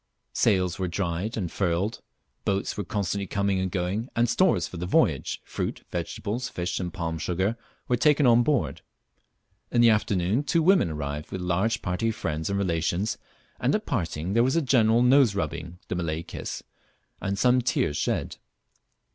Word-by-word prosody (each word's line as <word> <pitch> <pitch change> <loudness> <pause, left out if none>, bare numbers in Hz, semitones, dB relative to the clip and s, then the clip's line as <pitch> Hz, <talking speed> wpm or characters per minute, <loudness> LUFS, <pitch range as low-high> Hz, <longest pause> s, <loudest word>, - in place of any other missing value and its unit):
Sails 90 -1 +2
were 95 - 0
dried 90 +4 -2
and 90 -6 -2
furled, 95 +4 -1 0.4
boats 100 0 -1
were 105 - -3
constantly 100 +1 -2
coming 100 -1 0
and 95 0 -1
going, 95 +7 -2
and 120 +1 +3
stores 120 - +2
for 90 - -9
the 90 +1 -4
voyage, - - +1
fruit, - - -4
vegetables, 115 +5 -3
fish, 90 0 -3
and 90 -2 -3
palm 85 -4 -3
sugar, 95 +7 0 0.3
were 125 - +2
taken 150 +2 +4
on 120 -1 +6
board. 140 0 0 0.9
In 120 - +1
the 120 -1 +7
afternoon 105 +1 +1
two 165 +2 +1
women 185 - +4
arrived 75 0 -5
with 95 - -4
a - - -4
large 100 +6 0
party 95 +5 0
of 110 - -3
friends 80 -2 -3
and 100 - 0
relations, 90 +2 0 0.4
and - - +2
at - - -2
parting 80 +2 -2
there 115 - +4
was 130 +4 +1
a 165 - +3
general 120 -3 +4
noserubbing 100 - +2
(the - - -3
Malay 85 -2 -2
kiss), - - -6 0.6
and 100 0 -2
some 125 +4 +4
tears 95 -10 0
shed. - - -1
100 Hz, 170 wpm, -26 LUFS, 85-115 Hz, 0.9 s, the